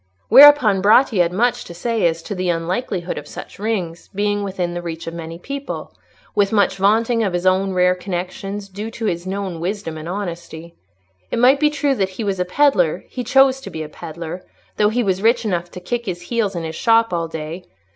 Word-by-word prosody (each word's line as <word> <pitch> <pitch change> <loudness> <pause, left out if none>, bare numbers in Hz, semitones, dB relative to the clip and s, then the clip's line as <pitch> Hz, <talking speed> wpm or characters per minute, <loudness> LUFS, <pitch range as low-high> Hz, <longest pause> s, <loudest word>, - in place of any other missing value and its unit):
Whereupon 255 -6 +8
Bratti 220 +1 +4
had 170 0 +1
much 235 +6 +1
to 170 - -10
say 225 +1 0
as 165 0 -3
to 205 - -5
the 185 -2 -2
unlikelihood 175 +2 -2
of 145 - -12
such - - -10
rings 190 -6 -3
being 205 0 0
within 185 -3 -3
reach 165 -1 -6
of 165 - -6
many 165 0 -7
people, 275 +9 -6 0.4
with 200 -1 +2
much 205 -2 +2
vaunting 225 +4 +2
of 195 -5 0
his 175 +1 -2
own 190 +1 +2
rare 180 0 +3
connections, 190 +2 -5
due 205 +3 -6
to 225 0 -6
his 175 -2 -2
known 190 -3 -4
wisdom, 170 -3 -4
and 160 +2 -7
honesty. 170 -3 -6 0.6
It - - -2
might 255 +4 +5
be 300 0 +4
true 290 -1 0
that 195 -7 0
he - - -2
was 195 -2 -2
a 180 - +1
pedlar—he 200 - +1
chose 265 +2 +4
to - - -8
be 160 - -5
a 150 - -8
pedlar; 165 +3 -7 0.3
though 210 0 +4
he 240 +3 0
was 190 -2 0
rich 230 +2 +3
enough 175 -4 -1
to 180 - -9
kick 235 +5 -4
his 175 -2 -4
heels 210 -1 -1
in 170 - -3
his 160 0 -5
shop 230 -1 +3
all 165 -1 -1
day. 160 +3 -7
190 Hz, 205 wpm, -20 LUFS, 175-225 Hz, 0.6 s, Whereupon